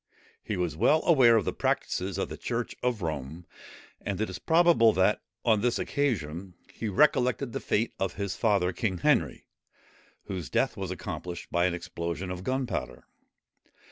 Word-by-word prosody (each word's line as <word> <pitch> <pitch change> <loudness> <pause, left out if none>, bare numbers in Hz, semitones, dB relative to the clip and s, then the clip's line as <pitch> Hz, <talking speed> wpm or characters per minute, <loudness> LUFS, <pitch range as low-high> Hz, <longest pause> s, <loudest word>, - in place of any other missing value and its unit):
He 105 - -3
was 90 -4 -1
well 155 - +3
aware 130 -9 +6
of 110 - 0
the - - -1
practices 95 0 -1
of 95 - -1
the - - -7
church 120 0 -3
of 120 -6 -1
Rome; 80 +2 -4 0.6
and 100 -1 -3
it 110 -3 -1
is 90 - -7
probable 160 -9 +5
that, 95 +3 +2 0.2
on 110 -3 +4
this 120 +1 +1
occasion, 95 - -2 0.2
he 110 - -4
recollected 125 +2 +2
the - - -2
fate 110 +2 0
of 95 -2 -1
his 100 -3 -3
father, 100 -5 +2
King 100 -5 -1
Henry, - - +1 0.8
whose 95 -5 -5
death - - +1
was - - -4
accomplished 90 -1 -6
by 85 0 +2
an 85 - -1
explosion 85 0 -4
of 90 0 -6
gunpowder. 125 - -3
100 Hz, 165 wpm, -28 LUFS, 90-120 Hz, 0.8 s, aware